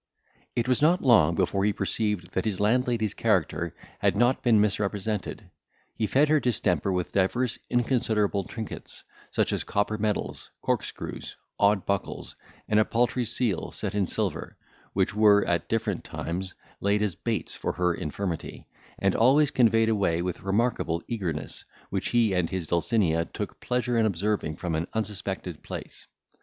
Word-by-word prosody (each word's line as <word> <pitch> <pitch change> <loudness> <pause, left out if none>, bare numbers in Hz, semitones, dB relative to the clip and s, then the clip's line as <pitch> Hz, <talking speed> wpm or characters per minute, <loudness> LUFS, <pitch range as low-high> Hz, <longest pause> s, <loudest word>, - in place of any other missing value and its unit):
It 120 -1 0
was 125 +1 +2
not 170 +4 +4
long 85 - +5
before 95 +3 +1
he 105 0 +2
perceived 100 -3 -1
that 95 - -1
his 105 -4 -1
landlady's 115 0 +1
character 100 -9 0 0.2
had - - +2
not 120 +4 +3
been 115 -4 +4
misrepresented. 105 0 -1 0.4
He 110 - -1
fed 140 +6 +4
her 155 0 +4
distemper 120 -5 +1
with 90 -1 -1
divers 115 +6 +1
inconsiderable 110 -5 +1
trinkets, 110 -2 -7 0.3
such - - 0
as - - -1
copper 105 +1 -1
medals, 105 -1 -2
corkscrews, - - -3 0.2
odd 100 -1 +3
buckles, 100 -1 -3 0.3
and 105 - +3
a - - +6
paltry 120 +2 +1
seal 115 -5 -1
set 105 -2 -4
in 100 -3 +1
silver, - - -3 0.4
which 95 0 +1
were, 105 -1 +5
at 85 -1 0
different 110 -5 -1
times, 95 +3 -4 0.2
laid 100 +1 +2
as 105 -4 0
baits - - -3
for - - -3
her 90 -1 +1
infirmity, 85 +2 -4 0.3
and 95 -1 +2
always 135 +5 +4
conveyed 115 -2 +4
away 95 -6 +1
with 90 -1 -3
remarkable 95 -5 0
eagerness, 90 -10 -4 0.3
which - - -1
he 115 -4 +3
and 90 -3 +1
his 95 -3 -3
Dulcinea 85 -1 +1
took - - -6
pleasure 125 -1 0
in 110 - +4
observing 100 -4 -1
from 85 0 -3
an 80 +2 -1
unsuspected 100 -5 -3
place. - - -8
105 Hz, 155 wpm, -27 LUFS, 95-115 Hz, 0.4 s, a